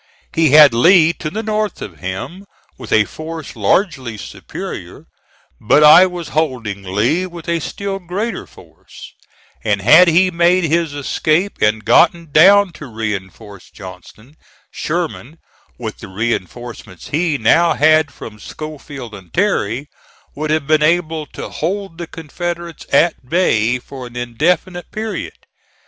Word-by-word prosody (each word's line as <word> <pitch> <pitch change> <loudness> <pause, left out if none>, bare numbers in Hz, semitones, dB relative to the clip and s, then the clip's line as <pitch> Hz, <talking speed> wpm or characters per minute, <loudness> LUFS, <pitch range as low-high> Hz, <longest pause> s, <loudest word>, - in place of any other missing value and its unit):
He 160 -2 +3
had 150 -2 +8
Lee 165 +6 +5
to 155 - -3
the 215 +7 -4
north 215 -1 -2
of 90 -6 -9
him 100 - -6 0.3
with - - -11
a 110 -1 +4
force 160 +2 -8
largely 130 - 0
superior; - - -8 0.5
but 145 +7 +3
I 160 +5 +8
was 175 -3 -7
holding 125 -10 -2
Lee 110 - 0
with 170 -2 -11
a 170 0 0
still 195 +4 -5
greater 195 +6 -4
force, - - -15 0.5
and 105 -2 +1
had 155 - +7
he 180 +3 +4
made 175 +2 +3
his 165 -2 0
escape 155 +6 -1
and 105 0 +1
gotten 165 +6 +3
down 195 +5 +6
to 150 - -7
reinforce 105 -3 -6
Johnston, 105 +8 -13 0.3
Sherman, 160 -3 -4 0.4
with 110 -3 -6
the 110 - -9
reinforcements 110 -1 -5
he 155 0 0
now 165 +9 +3
had 155 0 +3
from 105 -5 -11
Schofield 145 -4 -9
and 95 -3 -12
Terry, 145 - 0 0.5
would 155 +1 -3
have 155 -2 0
been 155 +1 +2
able 160 -1 +1
to - - -8
hold 185 +1 -4
the 170 - -5
Confederates 170 +2 -6
at 160 -6 +2
bay 125 -9 +2
for 125 0 -10
an 120 - -15
indefinite 165 +9 -1
period. 220 0 -6
155 Hz, 140 wpm, -17 LUFS, 115-175 Hz, 0.5 s, had